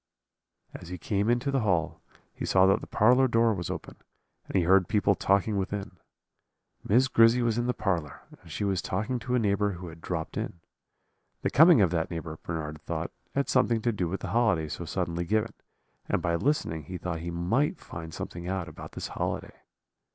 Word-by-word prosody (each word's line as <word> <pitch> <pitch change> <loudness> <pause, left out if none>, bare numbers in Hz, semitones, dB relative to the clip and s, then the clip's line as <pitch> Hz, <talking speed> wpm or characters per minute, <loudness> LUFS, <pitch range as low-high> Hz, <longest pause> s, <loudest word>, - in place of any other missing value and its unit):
"As 90 - -9
he 90 - -5
came 105 -2 -1
into 120 +3 +1
the 135 - +2
hall 90 -8 0 0.3
he - - -7
saw 95 0 +4
that 95 - +3
the - - -9
parlour 125 +5 +4
door 115 -1 +3
was 90 -4 -4
open, - - -6 0.5
and - - -7
he 95 - +4
heard 90 +1 +4
people 105 -2 +3
talking 100 +2 +1
within. 100 +1 -3 0.9
Miss 125 +6 +4
Grizzy 115 0 +5
was 115 -1 +1
in 120 - -1
the 125 - +1
parlour, 85 - -2 0.2
and - - -14
she - - -3
was 95 -3 0
talking 110 +9 -2
to 125 +1 -2
a - - +4
neighbour 105 -2 +1
who 90 0 -8
had 80 0 -13
dropped 80 -2 -4
in. 85 - -4 0.8
The - - 0
coming 160 -2 +7
of 90 -4 +3
that 85 -2 0
neighbour, 80 -2 -6
Bernard 75 -2 -5
thought, - - -4 0.2
had 140 0 +1
something 120 -3 +2
to 120 - +2
do 95 -5 -2
with 95 +4 -4
the - - -4
holiday 105 -10 +2
so 85 - -5
suddenly 85 0 -2
given, 110 +4 0 0.6
and - - +2
by 85 - -1
listening 85 - 0
he 90 +4 -6
thought 85 -1 -4
he 85 +1 -5
might 115 - 0
find 80 -1 -8
something 85 +2 -6
out 95 -2 -2
about - - -10
this - - -5
holiday. - - -3
95 Hz, 200 wpm, -28 LUFS, 85-115 Hz, 0.9 s, coming